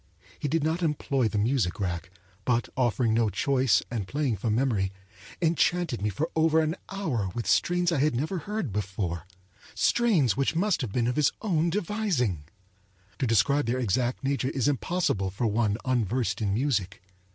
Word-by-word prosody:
He 150 Hz, -, -2 dB
did 155 Hz, +1 st, 0 dB
not 160 Hz, +3 st, 0 dB
employ 140 Hz, -6 st, +1 dB
the 110 Hz, -, -2 dB
music 105 Hz, -4 st, +1 dB
rack, 85 Hz, -3 st, -3 dB, 0.3 s
but, 120 Hz, -1 st, 0 dB
offering 120 Hz, -2 st, +1 dB
no 115 Hz, -1 st, +2 dB
choice 130 Hz, +2 st, +2 dB
and 110 Hz, -6 st, -3 dB
playing 140 Hz, -5 st, -1 dB
from 105 Hz, +3 st, 0 dB
memory, 110 Hz, -7 st, +1 dB, 0.5 s
enchanted 165 Hz, -, +1 dB
me 105 Hz, -, +1 dB
for 145 Hz, -, -2 dB
over 160 Hz, 0 st, +4 dB
an 160 Hz, +1 st, +1 dB
hour 150 Hz, -, -2 dB
with 115 Hz, -, -3 dB
strains 175 Hz, 0 st, +2 dB
I 160 Hz, -, +1 dB
had 150 Hz, -2 st, +2 dB
never 160 Hz, +9 st, -1 dB
heard 185 Hz, -, -4 dB
before; 95 Hz, -4 st, -3 dB, 0.5 s
strains 195 Hz, -, +3 dB
which 135 Hz, +3 st, 0 dB
must 185 Hz, -1 st, +1 dB
have 120 Hz, -6 st, -3 dB
been 120 Hz, +2 st, 0 dB
of 125 Hz, +3 st, -1 dB
his 150 Hz, -2 st, +4 dB
own 170 Hz, -5 st, +1 dB
devising. 170 Hz, -, -1 dB, 0.7 s
To 130 Hz, -, +1 dB
describe 115 Hz, +5 st, +2 dB
their 120 Hz, +2 st, 0 dB
exact 125 Hz, +2 st, 0 dB
nature 135 Hz, -1 st, 0 dB
is 135 Hz, -2 st, 0 dB
impossible 145 Hz, -, 0 dB
for 100 Hz, +6 st, -3 dB
one 105 Hz, -1 st, +1 dB
unversed 120 Hz, -3 st, 0 dB
in 100 Hz, -2 st, 0 dB
music. 100 Hz, -6 st, -1 dB
125 Hz, 170 wpm, -27 LUFS, 105-160 Hz, 0.7 s, over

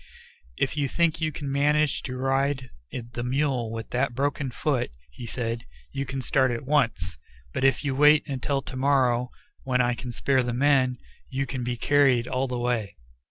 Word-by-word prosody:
"If 135 Hz, -, 0 dB
you 145 Hz, -1 st, +1 dB
think 165 Hz, +2 st, +1 dB
you 155 Hz, -1 st, +1 dB
can 140 Hz, -2 st, -5 dB
manage 150 Hz, +1 st, +2 dB
to 130 Hz, -1 st, -4 dB
ride 135 Hz, 0 st, 0 dB, 0.2 s
the 120 Hz, 0 st, -5 dB
mule 130 Hz, -3 st, 0 dB
with 115 Hz, 0 st, -6 dB
that 125 Hz, 0 st, 0 dB
broken 140 Hz, 0 st, -1 dB
foot," 130 Hz, 0 st, -1 dB, 0.2 s
he 115 Hz, -, -8 dB
said, 115 Hz, 0 st, -3 dB, 0.3 s
"you 140 Hz, 0 st, -3 dB
can 135 Hz, 0 st, -4 dB
start 130 Hz, +1 st, +3 dB
at 120 Hz, +1 st, -3 dB
once, 115 Hz, -, 0 dB, 0.3 s
but -, -, -2 dB
if 135 Hz, +2 st, +3 dB
you 140 Hz, -, 0 dB
wait 150 Hz, +2 st, +5 dB
until 135 Hz, 0 st, -1 dB
to 130 Hz, -, -8 dB
morrow, 130 Hz, -2 st, +2 dB, 0.3 s
when 130 Hz, -1 st, 0 dB
I 125 Hz, 0 st, +3 dB
can 120 Hz, +1 st, -6 dB
spare 130 Hz, +2 st, +2 dB
the 120 Hz, -1 st, -2 dB
men, 130 Hz, -1 st, +3 dB, 0.3 s
you 135 Hz, +1 st, -1 dB
can 130 Hz, -1 st, -4 dB
be 120 Hz, 0 st, -2 dB
carried 135 Hz, -3 st, +3 dB
all 130 Hz, +1 st, 0 dB
the 125 Hz, -1 st, -3 dB
way." 120 Hz, -4 st, -1 dB
130 Hz, 185 wpm, -26 LUFS, 120-140 Hz, 0.3 s, wait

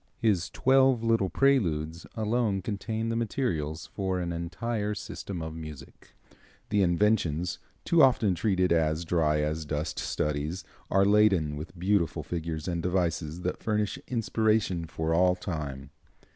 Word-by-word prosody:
His 100 Hz, -7 st, +1 dB
"Twelve 130 Hz, -2 st, +3 dB
Little 115 Hz, -4 st, +2 dB
Preludes" 85 Hz, -, +1 dB
alone 110 Hz, -3 st, 0 dB
contain 110 Hz, +2 st, -3 dB
the 115 Hz, -, -1 dB
materials 90 Hz, -, -2 dB
for 95 Hz, -2 st, -1 dB
an 85 Hz, -1 st, -2 dB
entire 105 Hz, +6 st, -3 dB
system 90 Hz, -4 st, -6 dB
of 80 Hz, 0 st, -5 dB
music. 75 Hz, -4 st, -10 dB, 0.5 s
The 105 Hz, -1 st, +2 dB
"Inventions," 90 Hz, -3 st, +1 dB, 0.3 s
too 170 Hz, -1 st, +4 dB
often 120 Hz, -7 st, +4 dB
treated 90 Hz, -2 st, +1 dB
as 80 Hz, 0 st, +1 dB
dry 75 Hz, -3 st, +2 dB
as 75 Hz, +1 st, -1 dB
dust 75 Hz, +1 st, -3 dB
studies, 75 Hz, +4 st, -2 dB, 0.3 s
are 95 Hz, 0 st, +4 dB
laden 100 Hz, -7 st, +4 dB
with 80 Hz, +4 st, -8 dB
beautiful 90 Hz, -2 st, +1 dB
figures 80 Hz, -2 st, -4 dB
and 85 Hz, -2 st, -1 dB
devices 85 Hz, -2 st, -1 dB
that 90 Hz, 0 st, -3 dB
furnish 105 Hz, +3 st, -1 dB
inspiration 110 Hz, -7 st, 0 dB
for 80 Hz, 0 st, -2 dB
all 90 Hz, +2 st, +4 dB
time. 75 Hz, -6 st, -5 dB
90 Hz, 135 wpm, -28 LUFS, 80-105 Hz, 0.5 s, too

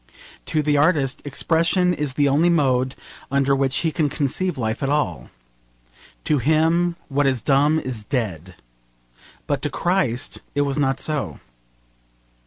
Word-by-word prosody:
To 155 Hz, -, 0 dB
the 145 Hz, 0 st, +2 dB
artist, 145 Hz, -3 st, +2 dB
expression 170 Hz, +5 st, +1 dB
is 150 Hz, -5 st, -2 dB
the 145 Hz, -1 st, +3 dB
only 150 Hz, +5 st, +3 dB
mode 130 Hz, -5 st, +1 dB, 0.3 s
under 140 Hz, 0 st, +2 dB
which 135 Hz, -1 st, 0 dB
he 165 Hz, -, 0 dB
can 155 Hz, -2 st, 0 dB
conceive 150 Hz, +5 st, -1 dB
life 110 Hz, -3 st, -2 dB
at 135 Hz, -, 0 dB
all. 90 Hz, -, -1 dB, 0.9 s
To 150 Hz, -2 st, +1 dB
him 160 Hz, +5 st, +2 dB
what 145 Hz, 0 st, +1 dB
is 130 Hz, -5 st, 0 dB
dumb 145 Hz, +2 st, +3 dB
is 130 Hz, -8 st, -4 dB
dead. 95 Hz, -, -3 dB, 0.9 s
But -, -, -1 dB
to -, -, -1 dB
Christ 175 Hz, -10 st, -1 dB
it 145 Hz, -, +2 dB
was 140 Hz, 0 st, -1 dB
not 135 Hz, -2 st, +1 dB
so. 140 Hz, -, -3 dB
140 Hz, 145 wpm, -22 LUFS, 130-155 Hz, 0.9 s, the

